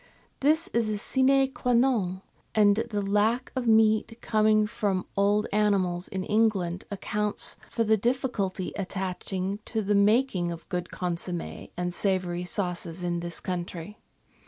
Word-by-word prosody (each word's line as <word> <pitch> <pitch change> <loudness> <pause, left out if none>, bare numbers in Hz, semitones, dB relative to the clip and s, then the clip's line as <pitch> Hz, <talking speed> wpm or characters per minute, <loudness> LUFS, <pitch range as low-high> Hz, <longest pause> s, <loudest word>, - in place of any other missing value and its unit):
This 310 +4 +3
is 230 -2 0
a 210 - -1
sine 265 +4 +3
qua 250 -2 -1
non, 220 -7 +2 0.3
and 205 -1 +5
the 205 -2 -1
lack 210 +5 +1
of 255 -2 -2
meat 220 0 +3
coming 215 -1 +3
from 205 -3 -1
old 205 +1 +2
animals 190 -4 +1
in 190 -1 -4
England 195 -5 +1
accounts 210 +1 -1
for 230 - 0
the 220 0 +3
difficulty 220 -5 -1
attaching 190 0 -3
to 220 -2 -1
the 205 +1 +1
making 200 -3 +3
of 165 -1 -7
a - - -38
good 180 -1 -2
consomm^ 175 -1 -4
and 175 0 -2
savoury 180 -2 -1
sauces 180 -2 -3
in 175 -1 -1
this 170 0 -4
country. 180 +2 -5
205 Hz, 145 wpm, -27 LUFS, 180-220 Hz, 0.3 s, and